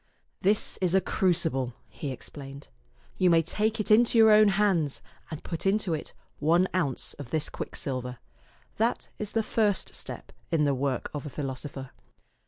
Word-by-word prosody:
"This 205 +3 +2
is 185 0 +2
a - - +6
crucible," 160 -10 0
he 145 - -6
ex 130 - -8
plained. 140 0 -10 0.2
" - - -32
You 185 - +5
may 165 -1 +5
take 215 +7 0
it 215 - -1
into 230 +2 +5
your 220 -1 +7
own 215 0 +7
hands 190 -7 +2 0.3
and 155 - -7
put 165 +3 -3
into 195 -3 +1
it 155 - -5 0.2
one 170 +5 +3
ounce 150 -8 -1
of 140 -5 -7
this 155 +1 0
quicksilver. 125 -2 -4 0.6
That 230 +2 0
is 210 -1 -4
the 225 - +1
first 210 -3 0
step - - -8 0.2
in 165 -3 +2
the 140 - +2
work 135 -1 -2
of 145 -1 -5
a - - -5
philosopher. 135 -1 -5
165 Hz, 175 wpm, -28 LUFS, 140-205 Hz, 0.6 s, your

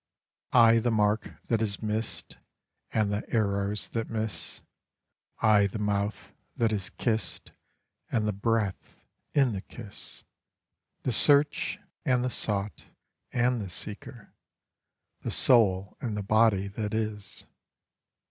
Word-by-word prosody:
I 115 -1 +7
the 120 +2 0
mark 105 -1 +1
that 115 -2 +1
is 105 -1 +1
missed 110 +1 -3 0.5
And 105 -2 +1
the 105 - -1
arrows 100 -2 0
that 115 -1 -3
miss, 110 -7 -3 0.8
I 105 -2 +5
the 100 - -6
mouth 105 0 -2 0.2
that 115 -1 +1
is 100 -4 -2
kissed 110 -4 -2 0.6
And 110 -2 +1
the 105 - 0
breath 105 -1 -1 0.4
in 135 -4 +4
the 95 - -4
kiss, 105 -2 -10 0.8
The 130 - 0
search, 145 +5 +3 0.3
and 125 -1 +2
the 125 - -1
sought, 105 -2 -1 0.5
and 125 -1 +1
the 100 - -5
seeker, 105 +5 -7 0.9
the - - -3
soul 100 -6 +4
and 110 -4 -3
the 105 - -2
body 110 -1 +3
that 105 +1 -3
is. 105 -2 -3
110 Hz, 125 wpm, -28 LUFS, 100-115 Hz, 0.9 s, I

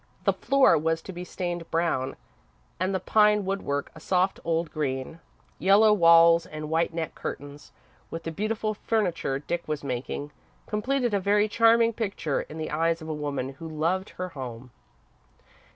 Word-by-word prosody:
The - - +3
floor 275 - +4
was 160 +1 -1
to 190 - -8
be 175 +1 -6
stained 175 -2 -5
brown 165 -6 0 0.6
and 185 +2 0
the 190 - 0
pine 210 +1 +3
woodwork 185 -7 -2
a 160 - -12
soft, 185 +3 +1
old 165 -1 -1
green. 135 +1 -3 0.4
Yellow 205 +3 +5
walls 170 -2 +6
and 155 0 -7
white 165 +1 +1
net 165 -2 -4
curtains, 145 +1 -7 0.4
with 165 0 -6
the 165 - -4
beautiful 215 +4 -2
furniture 195 -10 -1
Dick 170 +4 -4
was 150 -2 -3
making, 135 +2 -4 0.3
completed 245 +2 -1
a 200 - +2
very 205 +2 +2
charming 230 +1 +4
picture 200 -10 -2
in 155 - -10
the 155 -1 -4
eyes 165 +1 0
of 160 - -7
a - - -1
woman 145 -3 -3
who 140 +4 -9
loved 170 +5 -1
her 185 0 -3
home. 125 -5 -8
165 Hz, 165 wpm, -26 LUFS, 155-200 Hz, 0.6 s, walls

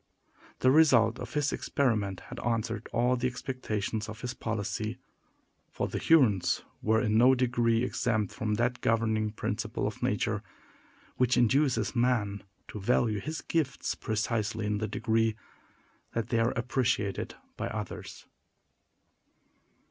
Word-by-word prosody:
The 130 - +5
result 125 -7 +5
of 125 - -7
his 145 -1 +1
experiment 105 -9 0
had - - -6
answered 115 -2 -2
all 120 +2 +2
the 125 0 0
expectations 115 -4 -3
of 110 0 -8
his 125 -1 -3
policy; 110 -1 -3 0.7
for - - -2
the - - -3
Hurons 125 - +3 0.2
were 110 +1 +3
in 110 -1 +2
no 130 +2 +6
degree 120 -2 +2
exempt 110 -5 0
from 105 -1 -1
that 120 +2 0
governing 110 -1 +1
principle 105 - -3
of - - -4
nature, - - 0 0.8
which 125 -1 +3
induces 125 -2 +2
man 115 -5 +1 0.3
to 105 - -6
value 110 0 +2
his 155 +9 -5
gifts 155 -5 -1
precisely 110 0 -2
in 105 0 0
the 110 - -1
degree 110 +1 +1 0.8
that 115 -2 -2
they 115 - +2
are 115 +1 +2
appreciated 120 -4 -1 0.2
by - - -3
others. - - -6
115 Hz, 135 wpm, -29 LUFS, 110-125 Hz, 0.8 s, no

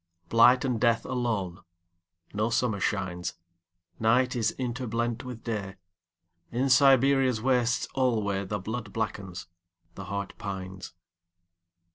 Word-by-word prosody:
Blight 125 +3 +6
and 120 -4 -1
death 115 -2 +3
alone.No 90 -4 -4
summer 115 -3 0
shines. 90 -3 -2 0.6
Night 125 +3 +3
is 110 -3 +1
interblent 120 -1 -2
with 125 -3 -8
Day.In 95 +2 -5
Siberia's 135 -2 +5
wastes 125 0 +1
alwayThe 105 -6 0
blood 110 0 -5
blackens, 95 -5 -4 0.5
the 95 - -8
heart 100 +1 -4
pines. 95 -1 -6
110 Hz, 95 wpm, -28 LUFS, 95-125 Hz, 0.6 s, Blight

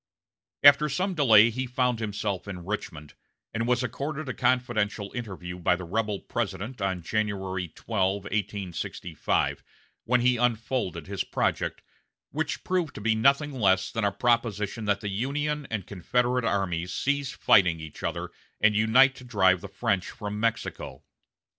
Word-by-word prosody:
After 145 +1 +7
some 185 +7 -1
delay, 115 -8 +6
he 130 +3 -3
found 125 -1 0
himself 105 -3 -3
in 90 -3 -7
Richmond, 80 -7 -5 0.4
and 115 +1 -1
was 125 +1 +2
accorded 145 +3 -4
a 130 - -2
confidential 110 -5 0
interview 95 -7 -6
by 90 +1 +3
the 90 - -7
rebel 105 +3 -2
President 110 +1 -4
on 95 -3 -1
January 95 -3 -2
12, 95 +1 -1
1865, 95 -5 -2 0.4
when 125 +1 +3
he 125 0 +3
unfolded 120 -3 -1
his - - -3
project, - - -1 0.5
which - - -3
proved 180 -5 -1
to - - -6
be 110 +1 +2
nothing 140 +6 +3
less 95 -7 +2
than 115 -1 -2
a 100 - +2
proposition 115 -2 0
that 100 0 +1
the 105 - -3
Union 145 +7 -2
and 105 -5 -3
Confederate 125 +6 0
armies 90 -4 -1
cease 140 +1 -1
fighting 85 -4 +4
each 80 -1 -9
other - - -3 0.3
and 110 0 +4
unite 120 +6 +5
to - - -11
drive 95 -7 +3
the - - -7
French 100 -2 -1
from 105 0 -5
Mexico. 115 0 -3
110 Hz, 150 wpm, -27 LUFS, 95-125 Hz, 0.5 s, After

